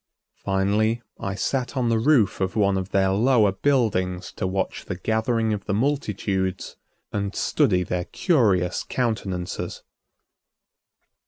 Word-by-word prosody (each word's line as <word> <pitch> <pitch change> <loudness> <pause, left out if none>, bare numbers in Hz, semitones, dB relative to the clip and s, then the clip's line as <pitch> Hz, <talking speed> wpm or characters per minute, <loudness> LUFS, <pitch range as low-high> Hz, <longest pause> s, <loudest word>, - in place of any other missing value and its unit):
Finally, 105 +4 +1 0.2
I 100 0 -3
sat 125 +7 -2
on 120 -2 +1
the 115 -1 +2
roof 115 -7 +3
of 95 0 -1
one 100 -2 +3
of 95 0 -2
their 95 -1 +2
lower 110 0 +4
buildings 95 -6 0
to 95 - -1
watch 95 +1 -2
the 95 - -4
gathering 110 +3 0
of 100 -2 -5
the 100 - -1
multitudes 100 -7 -1 0.4
and 100 -1 -2
study 90 0 +2
their 90 -1 -2
curious 100 - +1
countenances. 100 -8 -3
100 Hz, 130 wpm, -24 LUFS, 95-115 Hz, 0.4 s, lower